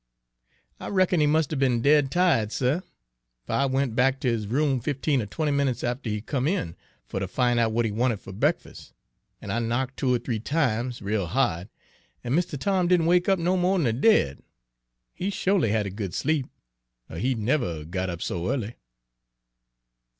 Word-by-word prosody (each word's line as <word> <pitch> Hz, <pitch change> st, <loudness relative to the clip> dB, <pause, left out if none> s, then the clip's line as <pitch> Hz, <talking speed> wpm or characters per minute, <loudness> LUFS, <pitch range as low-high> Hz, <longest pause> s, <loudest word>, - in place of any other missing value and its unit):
"I -, -, -7 dB
reckon 185 Hz, -3 st, +2 dB
he 150 Hz, -, +4 dB
must 155 Hz, 0 st, +1 dB
'a' -, -, 0 dB
be'n 125 Hz, -4 st, +1 dB
dead 145 Hz, -1 st, +4 dB
ti'ed, 165 Hz, -, +2 dB
suh, 135 Hz, +9 st, 0 dB, 0.6 s
fer -, -, -4 dB
I 140 Hz, -, +2 dB
went 135 Hz, -3 st, 0 dB
back 135 Hz, +2 st, +2 dB
ter 130 Hz, -, 0 dB
his 110 Hz, -3 st, -1 dB
room 135 Hz, +3 st, +1 dB
fifteen 140 Hz, +1 st, 0 dB
er 105 Hz, -, -5 dB
twenty 150 Hz, +7 st, -1 dB
minutes 140 Hz, -3 st, 0 dB
after 120 Hz, 0 st, -2 dB
he 105 Hz, 0 st, -2 dB
come 130 Hz, +3 st, -2 dB
in 155 Hz, -, -1 dB, 0.3 s
fer 95 Hz, -, -4 dB
ter 95 Hz, -, -3 dB
fin' 120 Hz, +4 st, +1 dB
out 115 Hz, -, +3 dB
w'at 115 Hz, +1 st, 0 dB
he 110 Hz, -, -1 dB
wanted 115 Hz, 0 st, 0 dB
fer 95 Hz, -, -11 dB
breakfus'; 95 Hz, -, -2 dB, 0.5 s
an' -, -, -6 dB
I 115 Hz, -, 0 dB
knock' 120 Hz, +3 st, -1 dB
two 130 Hz, -, 0 dB
or 125 Hz, -, +3 dB
three 115 Hz, -1 st, -3 dB
times, 125 Hz, -4 st, -1 dB
rale 100 Hz, -2 st, -1 dB
ha'd, 100 Hz, -5 st, 0 dB, 0.5 s
an' 120 Hz, -, -2 dB
Mistuh 170 Hz, -1 st, 0 dB
Tom 185 Hz, +4 st, +1 dB
didn' 175 Hz, -2 st, +3 dB
wake 175 Hz, +2 st, +3 dB
up 195 Hz, -, +4 dB
no 175 Hz, +2 st, +1 dB
mo' 185 Hz, +1 st, +2 dB
d'n 170 Hz, -, +1 dB
de 115 Hz, -4 st, +1 dB
dead. 115 Hz, -, +3 dB, 0.7 s
He 190 Hz, -, -3 dB
sho'ly 190 Hz, -, +1 dB
had 105 Hz, 0 st, +1 dB
a 100 Hz, -, -4 dB
good 100 Hz, -2 st, -5 dB
sleep, 150 Hz, -3 st, 0 dB, 0.6 s
er 80 Hz, -, -6 dB
he'd 125 Hz, +4 st, 0 dB
never 110 Hz, -, -1 dB
'a' -, -, -10 dB
got 95 Hz, +3 st, -3 dB
up 85 Hz, -1 st, -4 dB
so 85 Hz, +1 st, -2 dB
ea'ly." 120 Hz, -4 st, -3 dB
130 Hz, 200 wpm, -25 LUFS, 110-150 Hz, 0.7 s, he